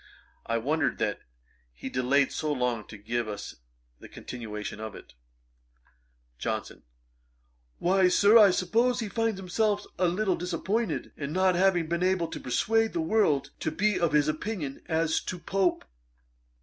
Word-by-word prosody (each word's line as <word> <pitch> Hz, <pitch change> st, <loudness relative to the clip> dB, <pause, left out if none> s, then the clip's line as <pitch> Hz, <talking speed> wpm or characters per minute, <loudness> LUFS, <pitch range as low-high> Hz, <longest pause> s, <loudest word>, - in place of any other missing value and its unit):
I 115 Hz, -, +1 dB
wondered 145 Hz, +7 st, 0 dB
that -, -, -1 dB, 0.6 s
he -, -, -7 dB
delayed 130 Hz, +2 st, +2 dB
so 155 Hz, -, -2 dB
long 125 Hz, -5 st, -1 dB
to 110 Hz, -, -10 dB
give 115 Hz, +3 st, -2 dB
us 105 Hz, -1 st, -6 dB, 0.4 s
the -, -, -12 dB
continuation 105 Hz, -4 st, -7 dB
of 110 Hz, -1 st, -6 dB
it. -, -, -13 dB, 1.3 s
JOHNSON. -, -, -4 dB, 1.0 s
'Why, 185 Hz, +1 st, +3 dB
Sir, 200 Hz, +4 st, +5 dB
I 215 Hz, -3 st, +9 dB
suppose 230 Hz, +7 st, +1 dB
he 220 Hz, -3 st, -3 dB
finds 225 Hz, -2 st, -1 dB
himself 205 Hz, +2 st, 0 dB
a 180 Hz, -, +3 dB
little 185 Hz, +1 st, +1 dB
disappointed, 180 Hz, +3 st, -2 dB
in 145 Hz, 0 st, -5 dB
not 185 Hz, 0 st, +3 dB
having 180 Hz, -2 st, +3 dB
been 170 Hz, +2 st, -2 dB
able 185 Hz, -2 st, +1 dB
to -, -, -6 dB
persuade 225 Hz, -, +1 dB
the 345 Hz, -, -1 dB
world 155 Hz, -, +1 dB
to -, -, -1 dB
be 205 Hz, +6 st, +1 dB
of 170 Hz, -3 st, +1 dB
his 150 Hz, -1 st, +4 dB
opinion 155 Hz, -2 st, -3 dB
as 160 Hz, 0 st, +1 dB
to 185 Hz, -, -4 dB
Pope.' 190 Hz, +1 st, 0 dB
175 Hz, 150 wpm, -28 LUFS, 140-200 Hz, 1.3 s, I